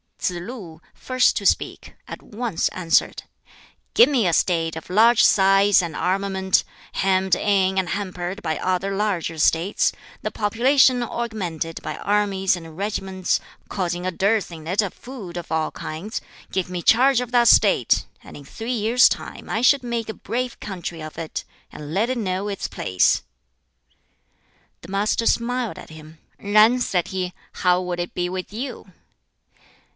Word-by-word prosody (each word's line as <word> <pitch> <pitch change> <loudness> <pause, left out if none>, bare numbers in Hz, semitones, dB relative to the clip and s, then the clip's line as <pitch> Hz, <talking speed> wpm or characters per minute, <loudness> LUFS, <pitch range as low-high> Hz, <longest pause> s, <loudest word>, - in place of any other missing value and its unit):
Tsz - - -1
lu 175 -2 -8
first 255 -1 +2
to 200 - -4
speak - - -1
at - - -8
once 220 -4 -2
answered, 175 -3 0 0.7
"Give 465 - +8
me 250 -9 +2
a 170 - +1
State 165 -2 +1
of 160 - -9
large 225 +5 +5
size 195 0 +5
and 170 -3 -5
armament, 190 0 +1 0.3
hemmed 190 -1 +2
in 190 -1 +1
and 180 -2 -2
hampered 185 0 -4
by 160 -2 -1
other 185 +2 -1
larger 190 -6 -1
States, 165 +5 +2 0.3
the - - -2
population 250 +4 +3
augmented 190 -10 -4
by - - -5
armies 200 -2 +1
and 165 -2 -10
regiments, 190 -2 -1 0.3
causing 175 -2 -2
a 185 - 0
dearth 200 +2 0
in 160 -2 -10
it 185 +5 +2
of 200 -4 -4
food 220 -9 -9
of 175 - -7
all 160 -1 0
kinds; 170 +8 -6 0.3
give 185 -2 -2
me 180 -1 -4
charge 255 +6 +4
of 250 -1 -4
that 240 -1 +4
State, - - +4 0.2
and - - -12
in 145 - -12
three 225 - -5
years' 235 +3 +4
time - - -6
I 225 - -1
should 265 +2 +4
make 235 -2 -3
a - - -3
brave 245 +1 -4
country 175 -4 -6
of 155 0 -9
it, 165 -1 -5 0.3
and 150 +1 -8
let 215 +6 +1
it 255 - -1
know 190 -2 -2
its 200 -2 -3
place." 90 -1 +1 1.6
The - - -12
Master 210 +3 0
smiled 245 0 0
at - - -11
him. 155 0 -13 0.2
"Yen," 215 +4 +4
said 180 -8 -1
he, 185 -1 -3 0.2
"how 180 -1 +2
would 180 -1 -4
it 175 - -4
be 180 0 -1
with 185 +1 -5
you?" 230 -4 -7
195 Hz, 160 wpm, -22 LUFS, 175-225 Hz, 1.6 s, Give